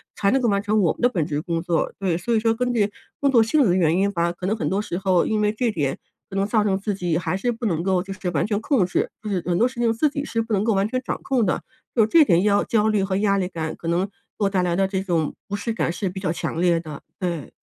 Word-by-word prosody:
才 200 - +1
能 270 - +3
够 245 - +1
完 200 -2 +2
成 210 +1 +1
我 170 - +3
们 - - -13
的 245 - +5
本 175 -10 -1
职 150 -2 -2
工 165 0 -2
作， 170 -1 0
对。 190 -4 0
所 235 +6 0
以 - - +3
说 225 +1 +2
根 250 +2 -1
据 210 -4 +1 0.3
工 280 -1 +2
作 240 -3 +6
性 275 +7 +3
质 225 - +3
的 175 - +3
原 170 -2 +3
因 200 +1 +2
吧， 170 -2 0
可 175 +1 -7
能 205 +4 +1
很 225 - -2
多 195 - 0
时 190 -4 -3
候， 190 -3 +2
因 215 -1 0
为 210 0 +2
这 230 +2 0
点 145 -8 -1 0.3
可 195 - -8
能 195 0 +1
造 215 0 +2
成 195 -2 +1
自 205 +1 -2
己 175 -4 -1
还 180 - -1
是 240 +6 0
不 235 0 -5
能 170 -6 0
够 185 -1 +1
就 195 0 -6
是 185 -1 -4
完 150 - 0
全 205 -1 0
控 240 - +2
制， 175 - -1
就 215 - -4
是 185 -3 -1
很 175 -1 +1
多 235 - +4
事 250 -1 -9
情 235 -1 +3
自 230 +7 +2
己 285 0 -4
是 230 -5 -1
不 225 0 -4
能 200 -1 +2
够 225 0 +2
完 195 +1 +1
全 255 +3 -2
掌 - - -3
控 255 -5 +1
的， 180 - 0 0.3
就 225 -3 +5
这 310 +9 +6
点 170 -8 +4
要 205 -1 +3
焦 220 -2 +1
虑 210 -2 +2
和 190 0 -1
压 200 -1 +2
力 185 -2 0
感， 160 -3 -4
可 165 - -8
能 170 +3 +1
给 - - -25 0.3
我 200 -2 +2
带 190 -2 +1
来 175 -1 0
的 195 +1 +2
这 190 -1 -2
种 165 -5 -1
不 205 - -3
适 230 +3 -3
感 220 - -1
是 180 +3 -2
比 185 +2 -6
较 185 -4 -1
强 165 -1 -3
烈 170 -1 +3
的， 155 -4 -8 0.2
对。 170 -6 -3
195 Hz, 335 characters per minute, -23 LUFS, 175-220 Hz, 0.3 s, 作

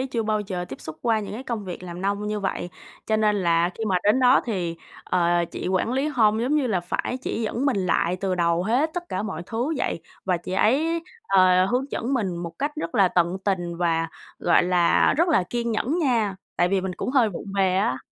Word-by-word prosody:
chưa 235 -3 -1
bao 215 -1 0
giờ 185 -3 -4
tiếp 135 - -8
xúc 155 0 -7
qua 225 -2 +2
những 205 - -6
cái 230 +5 -6
công 230 -6 -4
việc 180 -1 -7
làm 175 -1 -7
nông 200 +2 -1
như 210 0 -2
vậy. 190 -2 -3 0.4
Cho 220 - +2
nên 215 -1 +2
là 170 -2 +2
khi 225 - -4
mà 190 -3 +1
đến 210 +6 +4
đó 255 +1 +6
thì, 180 -7 -2 0.3
ờ, 175 -1 +2
chị - - -4
quản 190 +5 0
lý 270 +4 0
home 220 -5 +2
giống 265 +5 +1
như 280 - +1
là 195 -7 0
phải 180 +7 -3
chỉ 230 - -2
dẫn 235 +5 -1
mình 275 - +2
lại 180 -1 +1
từ 190 -2 0
đầu 170 0 +1
hết 255 +10 +1
tất 355 -1 -3
cả - - -2
mọi 190 -6 -4
thứ 245 +8 -2
vậy, - - -2 0.2
và 185 -2 +1
chị 175 +2 -7
ấy, 315 - +2 0.2
ờ, 185 -1 +5
hướng 250 +6 0
dẫn 260 +4 -2
mình 190 -8 -1
một 170 -1 -5
cách 290 +2 -1
rất 165 0 -4
là 195 -3 +5
tận 175 +1 +1
tình 175 -4 -1
và, 165 -1 0 0.3
gọi 175 - +4
là, 175 -1 +3
rất 340 +4 +3
là 305 - +4
kiên 235 -1 -1
nhẫn 260 +9 0
nha, 230 - +1 0.2
tại 175 0 +3
vì 195 0 +1
mình 190 0 -3
cũng - - -3
hơi 255 -4 +4
vụng 190 - -7
về 190 -1 +2
á. 160 -10 +1
200 Hz, 240 wpm, -24 LUFS, 180-235 Hz, 0.4 s, đó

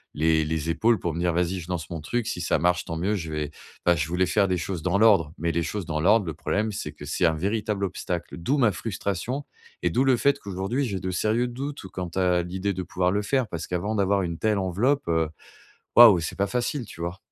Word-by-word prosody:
les 80 0 +2
les 80 0 -2
épaules 110 +7 +2
pour 85 -2 -2
me - - -3
dire: 85 0 +1
«Vas-y 90 +2 0
je 85 - -9
lance 85 -4 -3
mon 85 - -4
truc, 110 +9 -2
si 90 - -3
ça 85 - +1
marche 90 +1 +1
tant 80 - -4
mieux». 95 +6 0
Je 80 -5 -4
vais 75 -1 -3 0.3
bah, 85 - +5
je 75 -2 -1
voulais 90 +2 +1
faire 100 +2 +3
des 90 -1 0
choses 85 -1 -4
dans 90 +2 +1
l'ordre, 100 -9 +5
mais 85 +1 0
les 85 +1 0
choses 100 +3 -3
dans 80 -2 -1
l'ordre 100 +4 +4
le 80 - -4
problème 105 +6 -1
c'est 100 - -5
que - - -11
c'est - - 0
un 80 - +4
véritable 100 +4 -1
obstacle. 90 -2 -4
D'où 125 +13 0
ma 120 -5 +4
frustration 110 +6 -3 0.4
et - - +2
d'où 130 - +2
le 135 -2 +4
fait 140 +4 +3
qu'aujourd'hui 100 +5 -2
j'ai 100 -6 -3
de 95 - -4
sérieux 110 +6 +1
doutes 135 +4 -5
ou 95 - -9
quant 90 -1 -5
à 90 -2 +2
l'idée 95 +3 -2
de 95 0 -4
pouvoir 90 +1 0
le 105 +2 0
faire, 130 +2 +1
parce 85 -5 -5
qu'avant 95 +5 -2
d'avoir 100 -1 +2
une 85 -3 -3
telle 105 +3 +1
enveloppe, 115 +10 +1
heu, 80 -2 +1 0.7
waouh, 115 -6 +9
c'est 80 - -4
pas 100 - +2
facile, 125 +2 -2
tu 85 - -11
vois? 85 +2 -4
95 Hz, 250 wpm, -25 LUFS, 85-110 Hz, 0.7 s, waouh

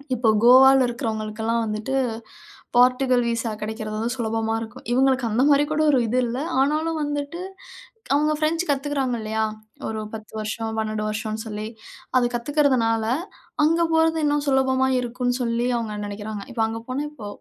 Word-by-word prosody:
இப்போ 230 -2 +2
கோவால 265 +2 +8
இருக்கிறவர்களுக்கெல்லாம் 225 0 -2
வந்துட்டு, 215 +5 -3 0.8
போர்ச்சுகல் 250 0 +4
விசா 230 -1 -1
கிடைக்கிறது 215 0 -4
வந்து 235 +2 -1
சுலபமா 225 -2 -1
இருக்கும். 230 +3 -9
இவங்களுக்கு 260 0 +3
அந்த 225 +4 +1
மாதிரி 285 0 +5
கூட, 310 0 +1
ஒரு 265 - +4
இது 250 +3 +1
இல்ல. 240 +1 -3 0.2
ஆனாலும் 310 +3 0
வந்துட்டு, 290 +3 -3 0.7
அவங்க 305 +1 +2
பிரெஞ்ச் 325 +3 +1
கத்துக்கிறாங்க. 275 -3 -1
இல்லையா, 220 0 -1 0.4
ஒரு 220 -1 -3
10 220 -1 -8
வருஷம் 220 +1 -3
12 215 -1 -2
வருஷம்னு 215 +1 -3
சொல்லி. 215 0 -5 0.5
அத 240 -1 +3
கத்துக்கிறதுனால, 240 -4 +1 0.6
அங்க 330 +2 +3
போறது 320 0 +3
இன்னும் 290 0 +1
சுலபமா 265 -1 +2
இருக்கும்னு 245 +1 -2
சொல்லி 235 0 0
அவங்க 220 -2 -4
நெனைக்கிறாங்க. 205 0 -6
இப்ப 230 - -1
அங்க 225 0 -5
போனா 270 +3 -2
இப்போ 220 -9 -9
240 Hz, 150 wpm, -23 LUFS, 220-270 Hz, 0.8 s, கோவால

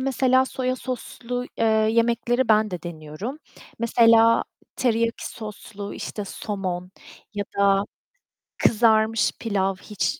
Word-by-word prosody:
mesela, 260 0 +3
soya 255 0 -2
soslu, 245 -1 -5
eee, 230 - +2 0.3
yemekleri 235 +1 +1
ben 215 0 +4
de 180 -3 -5
deniyorum. 170 - -6 0.4
Mesela, 230 0 +5 0.3
teriyaki 230 -2 0
soslu, 210 -2 -8
işte, 210 - -5
somon 185 -3 -4 0.4
ya 205 0 -2
da 200 0 +4 0.8
kızarmış 220 -1 +3
pilav, 195 -3 0
hiç 210 +9 -3
225 Hz, 105 wpm, -24 LUFS, 200-240 Hz, 0.8 s, Mesela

